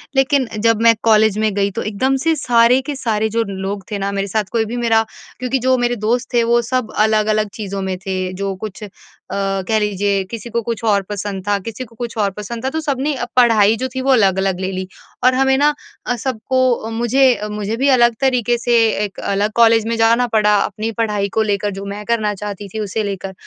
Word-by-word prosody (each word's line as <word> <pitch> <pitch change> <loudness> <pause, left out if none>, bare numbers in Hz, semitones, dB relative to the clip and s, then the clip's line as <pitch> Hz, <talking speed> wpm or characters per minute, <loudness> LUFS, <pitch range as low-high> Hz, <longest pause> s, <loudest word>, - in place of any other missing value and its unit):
लेकिन 270 -1 +2
जब 225 0 +2
मैं 230 0 +6
कॉलेज 220 -2 +4
में 215 -2 +1
गई 200 0 +1
तो - - -4
एकदम 260 +6 +1
से 325 0 +2
सारे 245 -2 +4
के 285 +1 -5
सारे 220 -4 -1
जो 230 +1 0
लोग 195 +1 -4
थे 205 - -1
न 200 +1 -2
मेरे 195 0 -1
साथ 215 +2 0
कोई 225 -2 +1
भी 240 +3 -5
मेरा 225 -2 +2 0.4
क्योंकि 255 +1 -1
जो 260 0 +4
मेरे 245 0 0
दोस्त 245 +2 -1
थे 235 -1 +3
वो 235 +1 +3
सब 255 -3 -1
अलग-अलग 215 0 +2
चीज़ों 200 -2 -5
में 190 -1 -3
थे। 185 -1 -2
जो 195 0 -3
कुछ 215 +1 -8 0.5
अ, 195 -1 -1
कह 220 -1 +2
लीजिये 200 -1 0
किसी 230 0 -6
को 235 +1 -1
कुछ 230 +1 -4
और 205 -2 +3
पसंद 200 -1 -5
था, 205 0 +2
किसी 230 +5 -6
को 230 -1 -20
कुछ 235 -1 -6
और 200 -2 +1
पसंद 225 +5 -7
था - - +1
तो 320 - -3
सबने 285 0 -1 0.2
पढ़ाई 225 -4 +5
जो 260 - -2
थी 260 - -1
वो 270 +1 +1
अलग-अलग 190 -5 +2
ले 190 0 -2
ली। 185 0 -4 0.4
और 255 0 +5
हमें 265 0 +3
ना 295 +2 +3 0.3
अ, 245 - 0
सबको 255 -1 -1
मुझे 240 +4 +2 0.3
मुझे 210 +1 -3
भी 275 +2 +1
अलग 240 -3 +4
तरीक़े 245 -3 +2
से 240 0 +1 0.3
1 195 - -9
अलग 200 +2 -1
कॉलेज 225 -1 +5
में 230 - 0
जाना 230 +2 +3
पड़ा 210 -1 +4
अपनी 215 +2 -4
पढ़ाई 210 -3 0
को - - +4
लेकर, 205 -1 -1
जो 195 +1 -7
मैं 200 +1 -6
करना 220 -3 0
चाहती 205 0 -6
थी, 220 - -4
उसे 215 +1 -2
लेकर। 195 -1 -5
220 Hz, 220 wpm, -18 LUFS, 200-240 Hz, 0.5 s, मैं